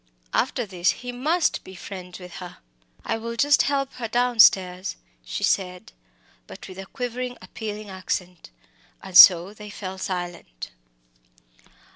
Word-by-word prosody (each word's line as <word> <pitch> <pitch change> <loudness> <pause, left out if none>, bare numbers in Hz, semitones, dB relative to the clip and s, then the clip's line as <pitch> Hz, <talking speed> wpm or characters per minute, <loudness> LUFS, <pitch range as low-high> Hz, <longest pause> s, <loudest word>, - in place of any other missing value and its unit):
after 245 - 0
this 185 -3 0 0.2
he 245 - -3
must 310 +8 0
be 190 - -12
friends 180 -1 -9
with 180 -1 -10
her. 180 -2 -9 0.5
"I - - -1
will 230 +1 -5
just 285 +4 +4
help 275 -2 0
to - - -27
get - - -14
her 230 - -3
downstairs," 215 -6 +3 0.3
she - - -5
said, 185 +2 -1 0.6
but - - -11
with 190 -1 -10
a 195 - -8
quivering, 245 +1 -5
appealing 210 -2 -7
accent 180 - -5 0.5
and 190 -2 -9
so 180 +1 +9
they 210 0 -11
fell 190 -2 -7
silent. 175 - -5
195 Hz, 145 wpm, -24 LUFS, 180-240 Hz, 0.6 s, so